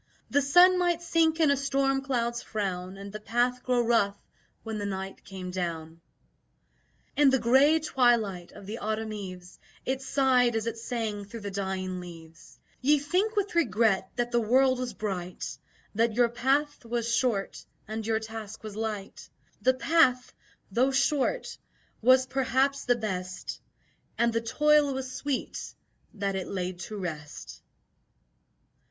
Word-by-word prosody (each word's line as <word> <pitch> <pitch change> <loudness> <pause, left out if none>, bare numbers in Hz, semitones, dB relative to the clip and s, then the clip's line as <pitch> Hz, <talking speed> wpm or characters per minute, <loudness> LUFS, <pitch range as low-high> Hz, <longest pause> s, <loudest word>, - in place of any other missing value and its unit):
The 285 - +4
sun 355 +6 +6
might 345 -1 +1
sink 330 -1 +2
in 310 -3 +5
a - - +4
storm 270 0 +1
cloud's 240 -3 -1
frown 190 -3 -4
And 200 +1 -9
the 215 - -5
path 245 +3 0
grow 245 -2 +1
rough 205 -4 +2 0.5
when 220 -1 -4
the 205 - -3
night 195 0 -5
came 185 -2 -7
down." 165 -2 -4 1.1
In 290 -1 +6
the 265 - +4
grey 265 +6 +5
twilight 235 - +1
of 200 - -12
the 215 +4 -6
autumn 220 +1 -2
eves, 185 -3 -8 0.3
It 265 +1 -1
sighed 255 -3 +3
as 225 0 -1
it 230 -1 -3
sang 225 -3 -3
through 225 +3 -9
the 200 -1 -5
dying 190 -1 -3
leaves: 165 -2 -12 0.2
"Ye 290 +3 +4
think 365 +10 0
with 405 -1 0
regret 220 - +2
that 240 0 -1
the 240 - +3
world 255 +3 +3
was 245 -4 -4
bright, 185 -4 -4 0.4
That 225 +1 +1
your 240 -1 +4
path 270 +5 0
was 235 0 -2
short 230 -6 0 0.2
and 220 +1 -4
your 220 0 0
task 220 -1 -8
was 215 -2 -7
light; 215 -3 -5 0.3
The 260 0 +3
path, 255 -3 +3 0.4
though 255 +3 +3
short, 275 - 0 0.4
was 255 +2 +5
perhaps 270 +1 0
the 245 - +3
best 185 -5 -5 0.6
And 235 -1 +2
the 230 - +1
toil 295 +3 +3
was 260 -1 -4
sweet, 280 0 -4 0.4
that 200 -1 -2
it 190 -1 -3
led 185 -2 -4
to 210 +4 -6
rest." 155 -6 -7
235 Hz, 150 wpm, -28 LUFS, 200-265 Hz, 1.1 s, sun